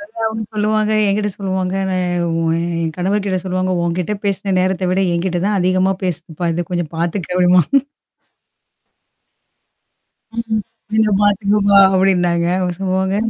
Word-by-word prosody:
இதெல்லாம் 225 +2 -5
அவுங்க 220 0 -3
சொல்லுவாங்க 215 0 +1 0.2
என்கிட்ட 205 +1 0
சொல்லுவாங்க. 190 -1 -2 0.2
நான் 180 -1 -1 0.2
உ - - 0 0.2
என் 165 -1 -2
கணவர்கிட்ட 195 +1 0
சொல்லுவாங்க, 185 0 -1
"உன்கிட்ட 175 +4 -1
பேசின 195 -1 -1
நேரத்த 185 0 0
விட, 185 +1 +1
என்கிட்ட 175 +1 -1
தான் 205 -1 +1
அதிகமா 185 +1 +2
பேசுதுப்பா 170 -1 -3
இது. 175 -1 -3
கொஞ்சம் 175 -3 -3
பாத்துக்க" 175 +2 -2
அப்டிம்பாங்க 180 - +4 2.6
"ம் 225 -2 -1 0.3
கொஞ்சம் 215 -2 +3
பாத்துக்கப்பா!" 200 0 +3 0.2
அப்டின்னாங்க. 180 -3 +2
அவுங்க 180 -1 -1
சொல்லுவாங்க. 190 +1 0
185 Hz, 125 wpm, -18 LUFS, 180-205 Hz, 2.6 s, அப்டிம்பாங்க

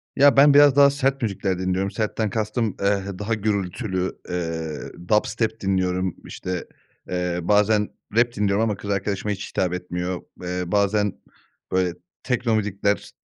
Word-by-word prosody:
Ya, 140 0 +5
ben 140 +1 +8
biraz 145 -1 +7
daha 140 0 +7
sert 135 -1 0
müzikler 100 -4 -1
dinliyorum. 95 +1 -1
Sertten 110 +1 -1
kastım, 110 +1 -1
eee, 100 -1 +2 0.2
daha 105 +2 -1
gürültülü, 100 -2 -2
eee, 80 -1 -4
dubstep 110 +1 +1
dinliyorum. 95 -2 0
İşte, 90 -2 -5 0.4
eee, 90 -1 -1
bazen 105 +3 +3 0.3
rap 120 +1 +3
dinliyorum 105 +1 +1
ama 110 -2 0
kız 105 0 -8
arkadaşıma 100 +1 -1
hiç 100 -1 -4
hitap 90 -1 0
etmiyor. 90 0 -3 0.2
Eee, 90 0 -2
bazen, 105 0 +2 0.6
böyle, 90 -1 +1 0.3
tekno 120 -3 +1
müzikler 100 -1 -1
100 Hz, 140 wpm, -23 LUFS, 90-110 Hz, 0.6 s, ben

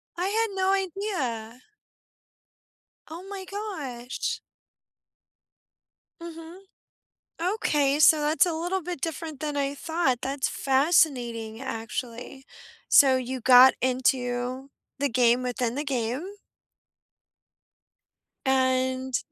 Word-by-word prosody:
I 355 - -2
had 440 -1 0
no 380 0 +1
idea. 320 - -3 1.5
Oh 330 +3 -8
my 390 -2 -7
gosh. 300 - -5 1.8
Mhm. 335 +1 -10 0.8
Okay. 300 -7 +1
So, 310 0 +6
that's 305 +4 +3
a 345 - -1
little 350 +4 -2
bit 350 -2 -5
different 320 -2 -5
than 295 -1 -3
I 280 0 -1
thought, 305 -4 -1
that's 270 0 -1
fascinating, 260 -6 +1
actually. 240 +2 -6 0.4
So, 270 -3 +6
you 255 0 -4
got 255 +2 +8
into 255 +1 -1 0.3
the 285 +1 +1
game 245 0 +3
within 245 -1 -2
the 290 +3 -3
game. 255 +1 -2 2.2
And 260 -1 +1
270 Hz, 95 wpm, -26 LUFS, 250-330 Hz, 2.2 s, got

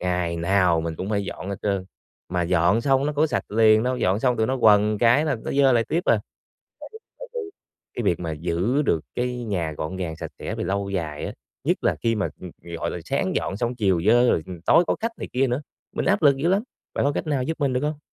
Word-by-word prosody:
ngày 90 -2 -1
nào 90 -1 +2
mình 80 0 -4
cũng 95 +5 -4
phải 100 -2 0
dọn 95 - -6
hết 100 - -3
trơn, 100 -2 0 0.4
mà 90 0 0
dọn 90 +5 +3
xong 135 +2 +2
nó 150 - -1
có 150 +2 +2
sạch 150 - -3
liền 110 0 +5
đâu, 125 +1 0
dọn 100 -2 +1
xong 125 -1 +2
tụi 110 - +1
nó 130 +2 0
quần 105 -2 +4
cái 120 +7 +4
là 145 -5 0
nó - - -3
dơ 135 -1 +4
lại 115 -1 +3
tiếp 170 - 0
à. - - +3 0.6
Bạn - - -9
biết 440 - -10 0.2
tại - - -9
vì 480 - -2 0.5
cái 120 - -3
việc 90 -4 +1
mà 85 -2 -3
giữ 90 - 0
được 85 - +1
cái 125 0 -2
nhà 90 -8 -2
gọn 80 +4 -5
gàng, 85 -4 -4
sạch - - -7
sẽ - - -4
về - - -3
lâu 100 0 -2
dài 80 -6 -3
á, - - -5 0.3
nhất - - 0
là - - +2
khi 115 0 +2
mà, 105 - 0 0.3
g - - -14
gọi - - -2
là, - - -4
sáng - - -1
dọn 95 - -2
xong, 120 +2 -1
chiều 95 -7 +1
dơ 120 +2 +5
rồi, 80 - +1
ừm, 90 -3 -8
tối 170 - +5
có - - +2
khách 230 +1 -1
này - - -5
kia 135 +2 +2
nữa, 125 +3 -1 0.3
mình - - 0
áp 200 -2 +2
lực 140 -3 +6
dữ 145 +5 0
lắm, 195 +3 +2 0.3
bạn - - 0
có 145 - +2
cách 160 - -3
nào 145 -4 0
giúp 160 +5 -3
mình 140 -2 +1
được 125 - 0
hông? 150 0 -2
110 Hz, 265 wpm, -24 LUFS, 90-135 Hz, 0.6 s, lực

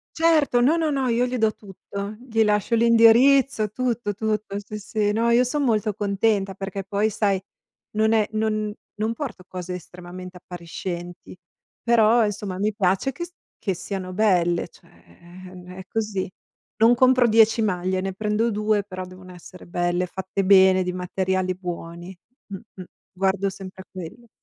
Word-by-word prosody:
Certo, 320 -6 +3
no, 265 +7 +4
no, 325 -2 0
no, 270 -3 0
io 240 +1 +2
gli 250 0 -2
do 220 -2 +2
tutto. 200 +1 -8
Gli 225 -3 +1
lascio 210 +2 +1
l'indirizzo, 230 +1 +5
tutto, 240 -3 -2
tutto. 215 -1 -2
Sì, 210 +1 -8
sì, 210 0 -1
no, 230 +2 +1
io 235 +1 +5
son 285 +4 -1
molto 215 -4 +1
contenta, 200 -1 0
perché 195 0 -5
poi, 200 +3 0
sai, 200 -2 0 0.5
non 220 +1 +2
è 215 -2 +3
non 215 -1 -1 0.3
non 220 +2 0
porto 240 -9 -6
cose 180 0 -6
estremamente 180 +1 -10
appariscenti, 175 0 -7 0.4
però, 230 -1 +4
insomma, 200 -2 -4
mi 210 +2 0
piace 195 +5 +1
che 345 - -5
st 350 - -17 0.3
che 195 - -1
siano 185 +1 -5
belle, 180 -4 +2
cioè, - - -22
ehm, 180 - -14
è 190 - -8
così. 210 -4 -2 0.5
Non 230 +2 +5
compro 255 0 +4
10 225 0 +4
maglie, 185 -2 0
ne 190 0 -3
prendo 215 +3 0
2, 210 0 +1
però 185 -2 -7
devono 185 0 -13
essere 180 +1 -13
belle, 175 +1 0
fatte 190 +2 -4
bene, 190 -1 +6
di 180 - -2
materiali 185 +1 -1
buoni. 175 0 -7 0.3
Mh-mh. 195 -1 -10 0.3
Guardo 195 +1 0
sempre 190 0 -10
a - - -41
quello. 185 +6 -9
205 Hz, 160 wpm, -23 LUFS, 185-225 Hz, 0.5 s, bene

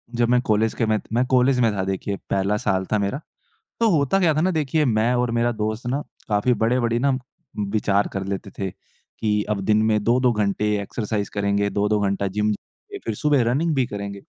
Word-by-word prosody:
जब 120 0 +2
मैं 125 0 +4
कॉलेज 110 -1 +1
के 115 - 0
मैं 110 -1 +1
मैं 120 +2 +2
कॉलेज 130 0 +3
में 115 -3 +3
था 95 - -1
देखिए 95 +1 -2
पहला 100 +2 +1
साल 95 -2 0
था 110 - +3
मेरा। 100 +7 -1 0.6
तो 230 - +4
होता 155 +2 +2
क्या 165 -4 +3
था 155 - +1
ना 185 +3 +2
देखिए, 155 -2 +1
मैं 115 -1 +2
और 125 -1 +1
मेरा 120 +1 +1
दोस्त 110 +2 -3
ना 135 +4 -1 0.3
काफ़ी 105 +4 +2
बड़े-बड़े 120 0 +2
ना 135 +1 +2 0.6
विचार 100 -2 +1
कर 95 -1 -3
लेते 100 0 -4
थे, 95 -1 -2
कि 105 +3 -4
अब 105 -2 0
दिन 110 +1 +3
में 110 -1 +2
2-2 125 +2 +3
घंटे 105 -1 0
एक्सरसाइज़ 105 0 -3
करेंगे, 100 0 +1
2-2 105 +1 +1
घंटा 100 0 0
जिम 105 +2 0
जाएँगे, 105 - -10
फ़िर 115 - -2
सुबह 145 +2 +2
रनिंग 155 +6 +1
भी 130 -3 +1
करेंगे। 100 -3 -6
110 Hz, 205 wpm, -23 LUFS, 100-125 Hz, 0.6 s, मैं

